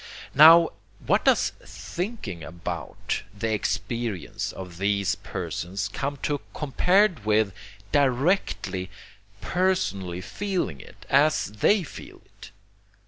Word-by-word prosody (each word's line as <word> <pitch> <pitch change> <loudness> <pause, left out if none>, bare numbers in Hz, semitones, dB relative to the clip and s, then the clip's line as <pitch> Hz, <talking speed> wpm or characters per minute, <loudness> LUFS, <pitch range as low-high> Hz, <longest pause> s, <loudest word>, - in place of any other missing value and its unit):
Now, 165 +3 +8 0.3
what - - +2
does - - +4
THINKING 175 - -6
ABOUT 85 +4 -4 0.2
the 110 +2 -1
experience 105 0 -2
of 90 -2 -9
these 100 0 +1
persons 95 0 -4
come 140 +1 -3
to 145 -1 -1
compared 180 - +2
with 105 -2 +2 0.4
directly, 130 - +1 0.5
personally 135 - 0
feeling 175 - -3
it, - - -15
as 150 +3 +3
they 180 - +2
feel - - -11
it? - - -14
110 Hz, 100 wpm, -25 LUFS, 95-160 Hz, 0.5 s, Now